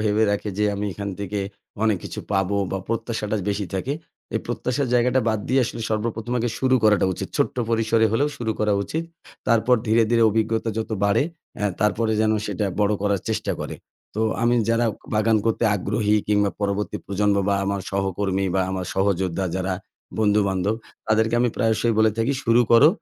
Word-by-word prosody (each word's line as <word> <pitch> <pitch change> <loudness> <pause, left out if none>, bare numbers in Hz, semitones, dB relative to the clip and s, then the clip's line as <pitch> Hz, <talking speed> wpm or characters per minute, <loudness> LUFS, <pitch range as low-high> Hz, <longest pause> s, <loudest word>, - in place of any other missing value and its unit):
ভেবে 105 0 +2
রাখে 105 +1 -1
যে, 105 - +3
আমি 100 +1 -3
এখান 100 0 -4
থেকে 100 +1 -3 0.4
অনেক 110 -3 +3
কিছু - - -5
পাবো, 95 +1 +1
বা 95 - -1
প্রত্যাশাটা 115 -2 -2
বেশি 100 -1 -2
থাকে। 125 +9 -1 0.4
এই - - +1
প্রত্যাশার 130 +1 -1
জায়গাটা 125 +2 +3
বাদ 110 -1 +1
দিয়ে 130 +1 +3
আসলে, 115 - -5
সর্বপ্রথম 115 +2 -2
আগে 120 - 0
শুরু 130 -1 +3
করাটা 105 -3 +4
উচিত। - - -5
ছোট্ট - - +1
পরিসরে 115 0 +3
হলেও 140 +6 +2
শুরু 110 -2 -2
করা 105 -1 +2
উচিত। 160 +10 -3 0.4
তারপর 115 +2 +4
ধীরে, 115 +1 +4
ধীরে 115 -1 +4
অভিজ্ঞতা 110 +1 0
যত 110 - -3
বাড়ে, 100 +6 +3 0.4
আ - - +2 0.2
তারপরে 110 +1 +2
যেন 110 0 +3
সেটা 105 0 -2 0.2
বড় 105 0 +3
করার 100 -2 +1
চেষ্টা - - -1
করে। - - -4 0.4
তো 110 - -2 0.2
আমি 120 +1 +3 0.2
যারা 115 +1 +2 0.3
বাগান 110 +1 +3
করতে 115 +1 +1
আগ্রহী 105 +2 0
কিংবা 105 -1 +3
পরবর্তী 100 +1 -1
প্রজন্ম 100 +1 +1
বা 100 - +3
আমার 100 0 -1
সহকর্মী 95 0 -1
বা 95 - +3
আমার 95 -1 -3
সহযোদ্ধা 95 -1 0
যারা 95 0 -1 0.5
বন্ধুবান্ধব, 100 -2 +2 0.3
তাদেরকে 110 +1 +2
আমি 120 - +3
প্রায়শই 115 0 +2
বলে 110 0 +5
থাকি, 115 +5 +2
শুরু 115 +1 +5
করো, 140 +7 +8
110 Hz, 175 wpm, -23 LUFS, 100-115 Hz, 0.5 s, করো